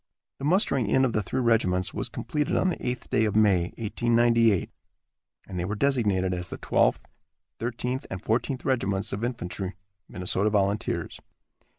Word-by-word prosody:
The 135 - -4
mustering 145 - +2
in 130 +6 +3
of 120 - -1
the 105 - +1
three 130 +7 -2
regiments 95 -6 +2
was - - -3
completed 150 -1 -2
on 185 - +2
the 180 - -4
eighth 125 0 -6
day 110 - +3
of 105 - -1
May, 100 -5 +4
1898, 115 -2 +2 0.8
and 90 -2 -5
they 85 - -1
were 105 +3 -2
designated 105 -8 +1
as 90 0 -4
the - - -7
Twelfth, - - +1 0.5
Thirteenth 125 +3 -3
and 95 - -4
Fourteenth 120 +6 -1
Regiments 100 -7 0
of 105 +3 -3
Infantry, 100 -5 -4 0.3
Minnesota 90 +3 0
Volunteers. 100 0 -1
110 Hz, 160 wpm, -26 LUFS, 95-125 Hz, 0.8 s, May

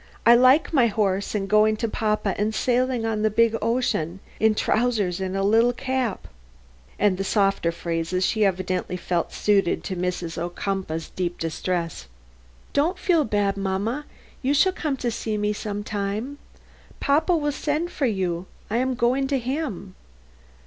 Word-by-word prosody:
I 235 - +8
like 255 +7 +5
my 255 -6 +5
horse 200 -2 0
and 195 -2 -1
going 215 +1 +4
to 230 - -1
papa 215 -2 0
and 215 +1 -1
sailing 250 -1 +1
on 220 -1 -1
the 215 - +3
big 230 +1 +3
ocean, 215 -7 0 0.2
in 220 -1 +3
trousers 215 -7 +1
and 190 0 -2
a 195 - 0
little 225 +4 +4
cap," 260 -3 -2 0.7
and 195 -2 +2
the - - 0
softer 195 -4 +1
phrases 170 +2 -2
she 220 -1 +1
evidently 185 -1 -1
felt 175 -1 -1
better - - -10
suited 200 -4 +2
to 190 - -4
Mrs. 175 -2 -3
Ocumpaugh's 175 -1 -3
deep 175 -1 -3
distress: 165 - -3 0.7
"Don't 330 +6 +1
feel 345 -4 +2
bad, 205 -4 0
mamma, 200 +9 -2 0.3
you 275 +2 +1
shall 375 +6 +4
come 300 -6 -2
see 230 -3 -2
me 210 0 0
some 205 0 -4
time. 210 +7 -3 0.6
Papa 315 +5 +2
will 295 -1 0
send 300 +4 -2
for 280 -6 0
you. 185 -4 -2 0.2
I 225 - +1
am 260 +1 0
going 250 +3 +1
to 275 0 +1
him." 255 - -4
215 Hz, 160 wpm, -24 LUFS, 190-255 Hz, 0.7 s, I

